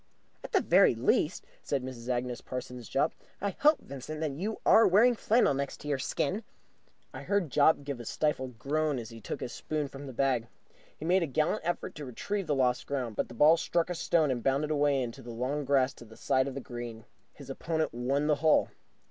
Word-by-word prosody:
"At - - -8
the - - +3
very - - +5
least," - - +1 0.2
said 140 -3 -2
Mrs. 125 -2 -7
Agnes 125 -1 -2
Parsons 125 -2 -7
Jopp, 135 - +1 0.3
"I 200 0 -1
hope, 300 +1 +4
Vincent, 140 +3 -7
that 155 -2 -1
you 195 +10 -4
are 225 - +7
wearing 220 +7 +5
flannel 225 -6 +3
next 140 +1 -4
your 145 -2 -1
skin." 165 +9 -1 0.7
I - - -7
heard 200 -8 0
Jopp 145 +1 +4
give 140 -3 -5
a 120 - -8
stifled 130 -2 -1
groan 150 +3 0
as 115 -2 -6
he 115 -1 -11
took - - -5
his 125 - -4
spoon 150 -2 -3
from 140 +1 -9
the - - -6
bag. 125 -2 +1 0.5
He 155 - -7
made 185 +3 +3
a 165 - 0
gallant 155 +9 0
effort 175 +2 -2
to 150 - -7
retrieve 190 - -3
the 145 - +1
lost 125 -2 +1
ground, 125 -6 -3
but - - -1
the 120 - -11
ball 155 +7 +6
struck 170 +1 0
a - - 0
stone 160 -3 +2
and 120 -2 -2
bounded 140 +4 +1
away 145 -3 +2
into 120 +2 -6
the 120 - -10
long 130 +5 -2
grass 135 -1 +2
to 120 - -13
the 110 0 -15
side 130 +1 +1
of 135 - -5
the 140 - -4
green. 120 -3 -7 0.3
His - - -9
opponent 160 -1 -2
won 135 +5 0
the 150 -1 +2
hole. 160 -1 +4
140 Hz, 215 wpm, -30 LUFS, 125-155 Hz, 0.7 s, are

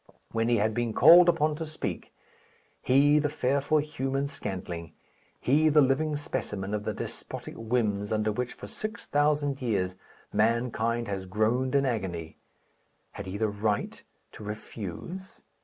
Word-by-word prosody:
When 115 +1 0
he 120 - +4
had 110 +1 +1
been 120 -1 -1
called 170 +7 +8
upon 155 -3 +2
to 160 - -4
speak 155 - -5 0.7
he 145 +3 +5
the 150 0 0
fearful 140 +3 +1
human 140 -2 -1
scantling, 90 - -6 0.5
he 155 +5 +3
the 150 0 +5
living 145 +3 +2
specimen 105 -8 -4
of 105 0 -2
the - - -1
despotic - - -6
whims 110 -3 -1
under 110 0 +1
which, 125 +3 -3
for - - -10
six 215 -1 -6
thousand 145 -1 +1
years, 95 -7 0 0.4
mankind 115 +1 +1
has 95 -2 -4
groaned 115 +7 +1
in 140 0 +4
agony 90 -10 -3 0.7
had 100 - -8
he 95 +2 -4
the 110 0 +1
right 105 0 -2 0.3
to - - -11
refuse? 110 - -7
120 Hz, 145 wpm, -28 LUFS, 105-145 Hz, 0.7 s, called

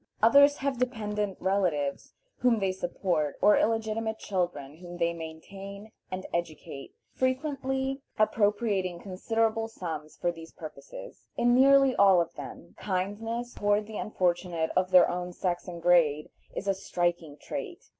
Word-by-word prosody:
Others 285 +5 +7
have 270 -2 -2
dependent 210 -5 -2
relatives 180 -7 -1 0.2
whom 245 -2 +3
they 195 -2 0
support, 175 -4 -1
or 210 - +6
illegitimate 220 0 0
children 175 -9 -3
whom 175 0 -9
they 170 0 +1
maintain 195 +6 -9 0.2
and 185 0 -5
educate, 155 -5 -5 0.2
frequently 265 0 -1 0.2
appropriating 205 -4 +1
considerable 225 +4 -1
sums 160 -8 -6
for 175 - 0
these 165 -1 -12
purposes. 150 -3 -10
In 240 0 +3
nearly 270 +1 +6
all 195 -3 +6
of 170 -1 -1
them, - - -9
kindness 215 +5 -3
toward 205 +1 +1
the 215 0 -6
unfortunate 175 -4 -1
of 185 0 +2
their 180 -1 +7
own 180 0 -4
sex 175 0 -2
and 175 -1 -6
grade 165 -4 +3 0.2
is 200 - -4
a 195 - +3
striking 175 -5 -2
trait. - - -6
195 Hz, 135 wpm, -28 LUFS, 175-225 Hz, 0.2 s, Others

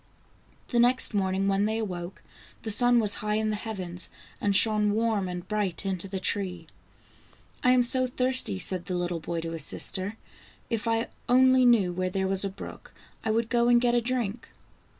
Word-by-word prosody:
The 240 - 0
next 245 0 +5
morning 195 -1 -1
when 195 +1 +1
they 220 +1 -2
awoke, 180 -4 -6 0.4
the 220 - -1
sun 245 +2 +6
was 210 -3 +1
high 210 0 -2
in 215 0 -1
the - - -2
heavens, 185 -5 -6 0.3
and 200 -1 0
shone 210 0 +3
warm 220 -3 -1
and 180 0 -7
bright 205 -4 -1
into 190 -1 -3
the 190 0 -5
tree. 185 -3 -2 0.5
" - - -30
I 250 - +3
am 250 -1 +4
so 255 +2 +4
thirsty," 255 - +3
said 180 - 0
the 185 - -3
little 175 -1 -3
boy 165 +1 -5
to 165 0 -6
his 165 -3 -4
sister. 195 +7 -3 0.5
"If 230 0 -3
I 225 0 -1 0.2
only 255 0 +4
knew 210 -7 +3
where 185 +1 -2
there 190 +1 -2
was 190 0 +2
a 195 - -2
brook, 195 - -12 0.3
I 225 - -3
would 225 +1 0
go 235 0 +1
and 240 0 +4
get 240 0 +1
a 240 - +2
drink. 235 -2 -4
210 Hz, 195 wpm, -26 LUFS, 185-235 Hz, 0.5 s, sun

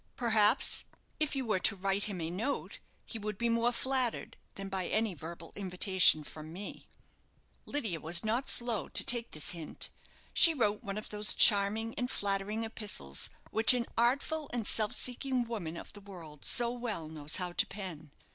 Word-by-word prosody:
Perhaps, 225 -1 +3 0.3
if 305 -2 -1
you 265 -2 -2
were 215 -5 0
to 200 - +3
write 195 +1 -1
him 200 -4 -4
a 160 +1 -3
note, 225 +10 -4 0.3
he 225 - -7
would 210 -1 -5
be 235 +2 -1
more 230 +1 +1
flattered 255 -1 -2 0.2
than 195 0 -6
by 190 -2 -3
any 220 -2 0
verbal 165 +1 -10
invitation 185 -4 +4
from 155 +1 -10
me." 195 +4 -8 0.8
Lydia 220 - -3
was 170 +5 0
not 235 +5 -1
slow 235 -4 +1
to - - +7
take 235 -1 +3
this 155 -2 -2
hint. 165 -3 -5 0.4
She 330 -2 +8
wrote 210 -5 0
one 200 -1 -5
of 215 - -7
those 210 0 +2
charming 215 +2 +4
and 250 0 -2
flattering 205 +1 -2
epistles 205 - 0 0.2
which 225 +3 +4
an 240 -1 -1
artful 280 +6 0
and 240 -3 -3
self 215 0 +2
seeking 255 0 -2
woman 200 -9 -6
of - - -10
the 205 - -12
world 170 -7 -11
so 235 -1 +4
well 235 -10 -5
knows 155 -1 -3
how 180 -2 -2
to - - 0
pen. 180 -7 -8
210 Hz, 175 wpm, -31 LUFS, 180-235 Hz, 0.8 s, She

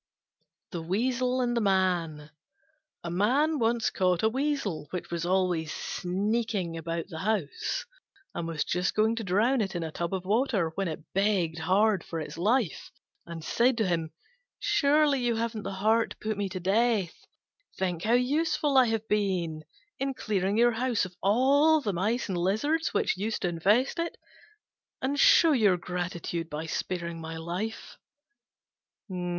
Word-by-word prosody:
THE 175 -4 -4
WEASEL 250 +8 0
AND 240 -1 0
THE 235 - +1
MAN 175 -6 0 0.7
A 170 - -4
Man 275 - +2
once 230 0 +1
caught 180 -1 +1
a 220 - +4
Weasel, 260 - -2
which 180 -2 -6
was 170 0 -2
always 180 -4 +1
sneaking 200 -1 -2
about 165 +2 -4
the 160 -3 -7
house, 195 -5 -2 0.5
and 165 - -4
was 165 -2 -1
just 180 +2 -1
going 220 +2 +3
to 225 - -3
drown 220 +7 +2
it 195 -3 -3
in 170 - -2
a 160 - -4
tub 170 +4 -3
of 185 -1 -5
water, 210 -5 +1
when 195 +2 -2
it 160 -2 -5
begged 190 -5 +1
hard 195 +4 +2
for 165 - -5
its 155 - -6
life, 210 +3 0 0.4
and 165 -1 -7
said 240 +8 +2
to 220 -4 +1
him, 165 -3 -1 0.5
"Surely 285 -1 +3
you 240 -1 +1
haven't 225 -1 -2
the 195 0 -5
heart 220 +4 +2
to - - -10
put 215 0 -3
me 200 -1 -2
to 185 0 -5
death? 200 -1 +1 0.6
Think 180 -3 -1
how 225 +2 +2
useful 285 +3 +2
I 255 - +5
have 225 -1 -2
been 185 -7 0 0.4
in 270 0 -2
clearing 200 -2 -1
your 240 +1 +5
house 240 -2 0
of 180 - -8 0.7
the 205 - -1
mice 210 +8 0
and 185 -3 -2
lizards 290 - 0
which - - 0
used 215 +3 -2
to 180 - +1
infest 205 - +2
it, 335 0 -3 0.8
and 280 +2 -1
show 330 +3 +6
your 210 -9 +4
gratitude 175 -1 -4
by 150 +2 -4
sparing 170 0 -4
my 160 0 -6
life." 180 +7 -5
195 Hz, 160 wpm, -28 LUFS, 175-235 Hz, 0.8 s, show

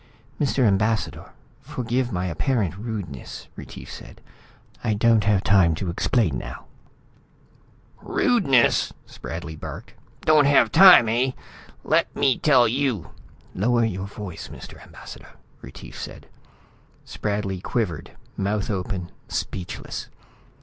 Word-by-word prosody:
"Mr. 140 -2 +1
Ambassador, 110 +1 0 0.3
forgive 125 0 -2
my 90 -2 -2
apparent 95 - -1
rudeness," 100 - -7
Retief - - -10
said. - - -11 0.6
"I 110 -3 +1
don't 110 0 +3
have 100 -2 +2
time 95 -5 +4
to 85 +1 -3
explain 85 - +1
now - - -8 0.7
" - - -32 0.2
"Rudeness!" 140 - +3
Spradley 80 -1 -7
barked. 75 - -9 0.3
"Don't 155 -2 +5
have 140 0 +4
time, 180 -9 +9
eh? 125 +4 +1 0.5
Let - - +1
me 130 -2 +2
tell 135 -5 +5
you 125 - -1 0.2
" - - -28
"Lower 120 +4 +2
your 95 -3 -3
voice, 100 -4 -8
Mr. - - -11
Ambassador," - - -12 0.3
Retief - - -10
said. - - -8 0.8
Spradley 100 -3 -3
quivered, 100 -7 -2 0.3
mouth 100 +1 -1
open, 90 -2 -4 0.2
speechless. 90 -2 -5
105 Hz, 115 wpm, -24 LUFS, 95-125 Hz, 0.8 s, time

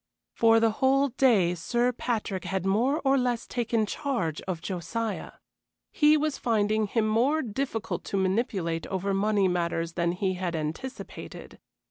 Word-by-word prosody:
For 225 0 +5
the 225 0 +3
whole 270 +5 +2
day 230 -9 +3
Sir 240 +8 0
Patrick 220 -6 -3
had 190 -1 -2
more 240 +10 +2
or 270 0 +4
less 245 -2 -1
taken 230 -2 0
charge 220 - -2
of 180 -3 -2
Josiah. 195 +5 -4 0.6
He 300 0 +5
was 305 -1 -1
finding 215 -2 +1
him 220 +1 0
more 255 +9 +2
difficult 230 -1 -3
to 200 - -2
manipulate 190 -4 -1
over 195 +1 -2
money 200 0 +2
matters 170 -2 -1
than 170 0 0
he 185 +1 -1
had 180 -2 -3
anticipated. 160 - -6
215 Hz, 145 wpm, -27 LUFS, 185-245 Hz, 0.6 s, For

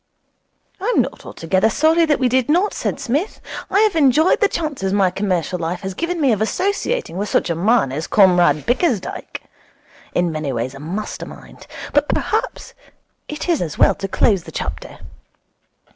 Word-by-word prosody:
'I 380 - -6
am - - +5
not - - -9
altogether 185 +6 0
sorry 320 +7 +3
that 295 - +2
we 255 - +1
did 255 +1 +1
not,' 360 +7 +2
said - - -3
Psmith. 295 - -2 0.3
'I 405 - +3
have 430 -4 +2
enjoyed 305 +2 +4
the 410 - +4
chances 295 - -3
my 195 -2 +2
commercial 180 -2 -1
life 170 +2 -3
has 190 -1 -5
given 335 - -3
me 275 -5 +3
of 215 -2 0
associating 400 - -1
with 205 +1 -2
such - - +1
a - - -1
man 200 - +2
as 155 +4 -4
Comrade 175 -7 +4
Bickersdyke. 245 - -1 0.7
In 175 -1 +1
many 155 -3 -3
ways 125 +1 -3
a 135 - -10
master 185 +8 -5
mind. - - -13 0.3
But 290 +1 +2
perhaps 450 +4 -2 0.5
it 300 +3 -5
is 340 -5 +1
as 160 -4 -4
well - - +5
to 195 - -5
close 195 0 +2
the - - -10
chapter. - - -6
215 Hz, 175 wpm, -19 LUFS, -, 0.7 s, am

